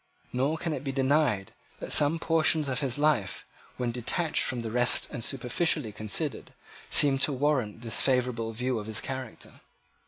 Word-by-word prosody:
Nor 135 +6 0
can 165 -1 -3
it 135 - -5
be 135 - -3
denied 135 -7 0 0.3
that - - -6
some 150 +3 +5
portions 160 -2 +2
of 130 -1 -2
his 135 -3 -1
life, 145 -10 0 0.3
when 120 -1 -2
detached 150 +7 -1
from 125 -2 -1
the 110 - -5
rest 125 +1 +3
and 115 - -5
superficially 135 0 0
considered, 105 0 -2 0.3
seem 135 -2 +4
to 145 - +3
warrant 130 -6 -1
this 115 -3 +2
favourable 125 -3 0
view 125 +1 -2
of 105 - -8
his 110 - 0
character. 130 -3 -7
130 Hz, 165 wpm, -27 LUFS, 115-145 Hz, 0.3 s, some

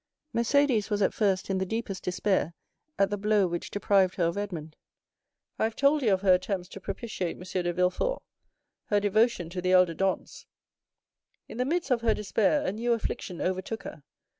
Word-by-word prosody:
"Mercédès 235 -3 +2
was 205 -1 +1
at - - +2
first 195 -4 +1
in 190 - 0
the - - +1
deepest 200 -1 -4
despair 180 -3 0 0.4
at 195 -1 +2
the 205 - -2
blow 210 -1 +3
which 175 -1 -3
deprived 195 -2 +2
her 180 - 0
of 170 0 +1
Edmond. 170 -7 -5 0.8
I - - +3
have 225 0 -3
told 285 +2 +3
you 225 -6 +2
of 190 -1 +2
her 190 -2 +5
attempts 180 0 -1
to - - -9
propitiate 195 -2 -4
M. - - -13
de 180 -1 -2
Villefort, 180 - 0 0.6
her 205 - +2
devotion 205 -2 +2
to 180 0 -4
the 185 +1 +1
elder 180 -2 +5
Dantès. 190 +2 -2 1.0
In - - -9
the 250 - +1
midst 330 +1 -1
of 240 -2 +2
her 225 -2 +2
despair, 210 +7 +1
a - - 0
new 235 +4 0
affliction 200 -5 -4
overtook 185 +4 -2
her. 150 - -9
195 Hz, 190 wpm, -28 LUFS, 185-225 Hz, 1.0 s, her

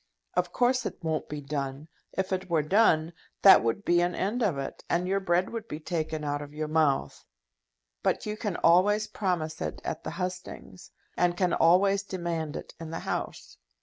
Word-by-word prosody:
Of 180 -1 0
course 250 +4 +2
it - - -7
won't 160 -1 -2
be 150 0 -5
done. 140 0 -4 0.3
If 190 0 -1
it 185 0 -3
were 160 -3 +2
done, 165 -2 +3 0.3
that 195 - +9
would 115 - -1
be 175 0 +4
an 175 0 0
end 215 +6 -1
of 195 -10 +1
it, 135 - -6
and 175 +1 +1
your 195 +1 +1
bread 180 -1 +1
would 230 -1 -5
be 150 - -6
taken 160 -2 -3
out 145 0 -2
of 145 0 -10
your 155 0 -2
mouth. 155 -3 +1 0.8
But - - 0
you 210 0 -3
can 210 -4 -3
always 205 +5 +5
promise 170 -7 -2
it - - -3
at - - -4
the - - -4
hustings, 180 - -6 0.3
and 175 0 +1
can 180 -2 +1
always 195 +4 +4
demand 170 -5 -4
it - - -7
in 165 -1 -7
the 165 - -5
House. - - -4
175 Hz, 190 wpm, -28 LUFS, 155-190 Hz, 0.8 s, that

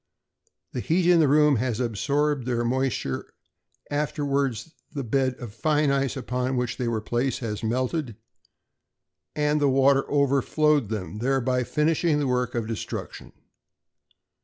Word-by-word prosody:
The - - -4
heat 170 +7 +1
in 175 -1 +5
the 155 - +5
room 150 -1 +4
has 120 -1 -1
absorbed 140 +4 0
their 120 -1 0
moisture, 125 - -2 0.6
afterwards 140 -3 -1 0.2
the 140 - -4
bed 130 +2 0
of 120 -5 -9
fine 150 +3 +1
ice 140 0 0
on 125 0 -2
which 125 -2 -2
they 125 - -2
were 115 -2 -1
placed 120 +4 -1
has 105 -3 -4
melted, 125 +2 -1 1.2
and 150 0 +1
the 145 - +4
water 135 +1 +3
overflowed 140 -1 +2
them, 105 -1 -4
thereby 130 0 +1
finishing 155 +3 +1
the 145 - 0
work 125 -2 0
of 115 -2 -1
destruction. 110 -1 -6
135 Hz, 135 wpm, -25 LUFS, 120-145 Hz, 1.2 s, in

